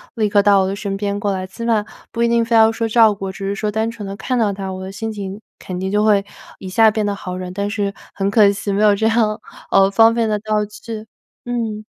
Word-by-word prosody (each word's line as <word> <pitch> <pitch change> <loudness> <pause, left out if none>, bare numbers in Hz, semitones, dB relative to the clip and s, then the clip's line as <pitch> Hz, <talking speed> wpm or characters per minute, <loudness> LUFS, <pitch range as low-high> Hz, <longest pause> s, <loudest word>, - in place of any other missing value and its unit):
立 220 -2 +1
刻 205 0 +3
到 200 -1 +5
我 190 - +1
的 195 - -2
身 200 -1 -4
边 200 0 -2
过 205 0 -1
来， 185 -1 -3
起 210 +5 -9
码 225 -3 +1 0.3
不 235 - -3
一 235 - +4
定 235 0 +2
非 230 +1 -3
要 225 -1 +6
说 230 0 -2
照 225 -1 +5
顾， 195 -1 -5
只 195 +1 -6
是 200 - -2
说 210 +1 -2
单 220 +2 -1
纯 225 -3 -7
地 195 - -5
看 250 +5 -2
到 220 -4 +2
他， 195 -1 -5
我 185 0 -7
的 190 - -6
心 225 +3 -4
情 200 -1 -6 0.2
肯 180 -1 -6
定 190 +1 -2
就 210 +1 +1
会 205 -2 +3 0.3
一 190 - -8
下 220 +4 +4
变 215 0 -1
得 205 -1 -1
好 185 -2 -6
了， 180 -1 -6
但 200 +1 -2
是 205 -2 -2 0.2
很 195 0 -1
可 205 -1 +5
惜 200 0 -3
没 205 +2 +1
有 210 -1 +6
这 220 +2 +1
样， 220 -2 +1 0.3
呃， 195 0 +5
方 225 +3 +5
便 230 -1 +1
的 210 -1 0
道 215 0 -1
具， 215 +1 -8 0.4
嗯。 225 -3 -3
205 Hz, 290 characters per minute, -19 LUFS, 195-220 Hz, 0.4 s, 要